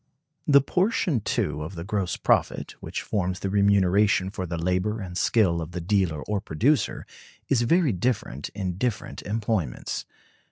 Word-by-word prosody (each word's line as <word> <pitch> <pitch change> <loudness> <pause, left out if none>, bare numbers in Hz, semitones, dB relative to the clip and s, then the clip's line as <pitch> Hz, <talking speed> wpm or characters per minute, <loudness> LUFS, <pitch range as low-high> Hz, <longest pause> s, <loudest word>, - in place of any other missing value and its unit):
The 140 -2 +7
portion, 180 - +1
too, 75 -6 -1
of 80 +5 -6
the 85 - -5
gross 95 -2 -2
profit, - - +1
which - - -5
forms 90 -3 -1
the 95 - -2
remuneration 100 -1 +3
for 95 -3 -4
the 85 0 -3
labor 90 +6 0
and 90 -3 -7
skill 90 -2 +2
of 80 +2 -7
the 90 - -3
dealer 90 -4 0
or 105 -2 -2
producer, 120 - +1 0.4
is 130 -4 +3
very 160 +4 +3
different 95 - -2
in 95 -3 -3
different 120 -3 -2
employments. 105 - -2
100 Hz, 155 wpm, -26 LUFS, 90-110 Hz, 0.4 s, The